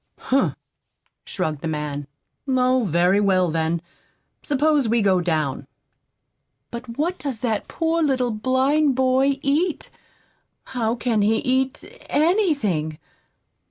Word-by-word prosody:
"Humph!" 270 +1 +1 0.7
shrugged 155 -6 -3
the - - -3
man. 150 -2 -4 0.4
"Oh, 255 -2 +2
very 180 +3 +3
well, 185 -4 +2
then. 165 +1 -1 0.6
Suppose 290 -3 +1
we 230 -1 +2
go 190 -2 +3
down." 155 -6 -1 1.0
"But 235 0 -7
what 340 +5 -1
does 265 -6 -4
that 225 -4 -1
poor 330 0 0
little 260 -5 +1
blind 260 +6 +2
boy 265 +1 +2
eat? 305 +5 0 0.7
How 230 -2 -2
can 230 -3 0
he 215 +2 +3
eat 260 +2 0 0.3
anything?" 285 - +1
245 Hz, 115 wpm, -22 LUFS, 185-275 Hz, 1.0 s, very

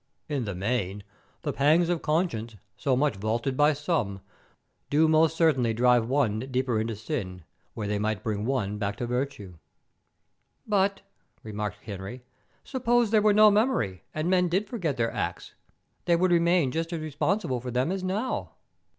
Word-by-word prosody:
In 140 -5 -2
the 100 -3 -4
main, 100 0 -2 0.4
the 145 - -2
pangs 155 +5 +3
of 175 -2 0
conscience, 150 - -1 0.2
so 130 +3 0
much 140 -4 +1
vaunted 115 +6 -1
by 150 +2 +4
some, 145 - -2 0.7
do 155 +2 +4
most 160 +1 +3
certainly 130 -9 +3
drive 120 0 +3
ten 125 -6 +1
deeper 125 -3 0
into 115 0 -3
sin 95 -4 -5 0.3
where 105 -2 -3
they 105 0 -1 0.2
bring 105 +1 -3
one 105 -6 -1
back 100 -1 -2
to 120 - -4
virtue." 120 - -4 1.1
"But," 200 -1 +1 0.4
remarked 105 -1 -5
Henry, 100 +4 -7 0.4
"suppose 240 -4 +1
there 215 -2 +5
were 210 0 +4
no 215 +1 +7
memory, 205 - +1
and 155 +2 -2
men 180 -1 +3
did 195 +5 0
forget 175 - -2
their 115 -1 0
acts, - - -4 0.5
they 170 - +4
would 180 +1 +2
remain 170 -4 +3
just 165 +3 -2
as 170 - -2
responsible 155 - -1
for 125 - -5
them 125 +6 0
as 190 -1 -3
now." 205 +7 -2
135 Hz, 160 wpm, -27 LUFS, 110-175 Hz, 1.1 s, no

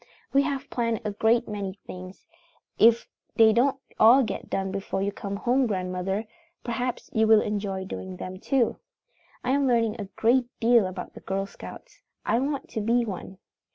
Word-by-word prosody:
"We 275 - +6
have 280 -1 -2
planned 230 -2 0
a 210 - 0
great 225 +3 +2
many 200 -3 -4
things. 185 +1 -10 0.5
If 230 +1 +5 0.3
they 220 -1 +6
don't 265 +4 +3 0.2
all 245 +5 +7
get 215 - -5
done 190 0 -1
before 195 0 -2
you 200 - 0
come 200 0 -5
home, 250 +5 +2
grandmother, 190 +1 -2 0.4
perhaps 245 +1 -3
you 220 -1 +3
will 220 -1 +7
enjoy 200 -2 -3
doing 185 -1 -6
them 185 +1 -7
too. 260 +2 +1 0.7
"I 250 - 0
am 280 0 +2
learning 230 -2 +2
a - - -4
great 240 +5 +2
deal 230 -3 +4
about 185 -1 -7
the - - -10
Girl 195 0 -2
Scouts. 195 - -12 0.2
I 235 - +2
want 275 +1 -2
to 220 - -3
be 235 +3 +2
one. 190 -2 -7
220 Hz, 175 wpm, -26 LUFS, 195-240 Hz, 0.7 s, all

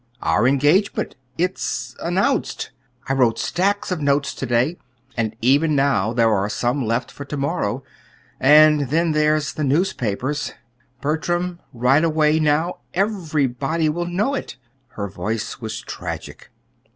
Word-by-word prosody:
"Our 110 +4 +3
engagement. 145 +9 +2 0.2
It's 180 +2 -2
announced. 195 - 0 0.4
I 135 - +1
wrote 125 -4 +3
stacks 200 +2 0
of 175 -4 -1
notes 140 0 +1
to - - -5
day, 125 +8 +1 0.4
and 110 -2 -1
even 145 +5 +4
now 135 -7 +2
there 115 -2 +3
are 100 0 0
some 125 +5 0
left 115 +2 -1
for 140 - -8
to 145 - -5
morrow. 135 -4 -1 0.6
And 150 -1 +6
then 165 +3 +2
there's 155 0 +1
the 155 - -3
newspapers. 140 - -1 0.5
Bertram, 175 +4 -1
right 130 +5 +3
away, 155 -1 +3
now, 155 +3 +1 0.2
everybody 160 - 0
will 175 +3 -2
know 200 +10 0
it." 270 - -5 0.3
Her 100 -3 -5
voice 110 +5 -4
was 110 0 -4
tragic. - - -7
145 Hz, 135 wpm, -21 LUFS, 125-165 Hz, 0.6 s, And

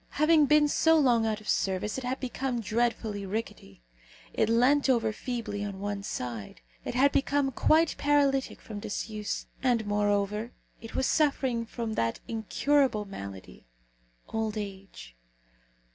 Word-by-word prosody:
Having 305 0 +5
been 300 0 +5
so 320 +2 +4
long 240 -6 +3
out 215 -1 -2
of 210 - -14
service, 195 +5 0
it - - -9
had 255 +2 -2
become 255 -1 -2
dreadfully 225 -2 -1
rickety; 195 - -6 0.5
it 220 - +1
leant 260 +5 +3
over 225 -4 +2
feebly 225 -3 -4
on 200 -2 -5
one 205 0 -3
side; 120 - -5 0.2
it - - -5
had 275 +3 +4
become 280 0 +1
quite 315 +5 +3
paralytic 280 -2 +2
from 210 -2 -7
disuse; 210 0 -4 0.2
and, 245 -4 +1
moreover, 205 +2 0 0.3
it 225 - -10
was 265 - +1
suffering 265 -7 +1
from 230 -1 -4
that 115 - -1
incurable 230 +1 +1
malady 100 - -9 0.6
old 220 -1 -2
age. 195 - -8
225 Hz, 140 wpm, -28 LUFS, 205-265 Hz, 0.6 s, Having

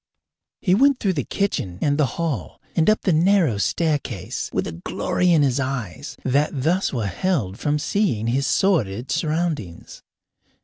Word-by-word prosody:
He 180 - +2
went 275 +5 +4
through 195 -3 +1
the 145 -6 -1
kitchen 110 - -2
and 145 +4 +1
the 145 - +4
hall 165 -7 -3 0.2
and 165 +4 +3
up 215 - +3
the 185 - +2
narrow 165 - +3
staircase 140 - -1
with - - -1
a - - -4
glory 135 - -1
in 160 -3 +5
his 135 -1 +1
eyes 125 - -4
that 140 +1 +1
thus 180 +5 +1
were 115 -6 -2
held 100 - -1
from 150 0 0
seeing 150 - 0
his 130 +4 0
sordid 130 - +1
surroundings. 155 - -2
145 Hz, 160 wpm, -22 LUFS, 115-175 Hz, 0.2 s, in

